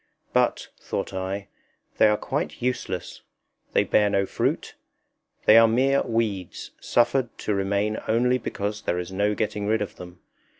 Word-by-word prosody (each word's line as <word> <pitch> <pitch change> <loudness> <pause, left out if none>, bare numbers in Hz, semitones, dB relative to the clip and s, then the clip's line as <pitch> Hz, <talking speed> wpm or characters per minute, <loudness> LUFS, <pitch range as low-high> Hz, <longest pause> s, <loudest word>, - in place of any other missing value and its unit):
But, - - +1
thought - - -4
I, 95 +1 -4 0.5
they - - +7
are 105 0 +3
quite - - -3
useless; 120 -8 -3 0.5
they - - +4
bear 105 -1 +3
no 100 -1 +1
fruit; - - -2 0.7
they 110 - +8
are 115 - +7
mere 135 +5 +3
weeds, 110 -6 -2
suffered 120 +1 +2
to 105 - -2
remain 100 +2 0
only 125 +3 +2
because 105 -2 -4
there 90 - -1
is 90 0 -4
no 100 +2 +1
getting 105 -1 -2
rid 110 +1 +2
of 100 - -9
them. 90 0 -11
105 Hz, 155 wpm, -25 LUFS, 100-115 Hz, 0.7 s, they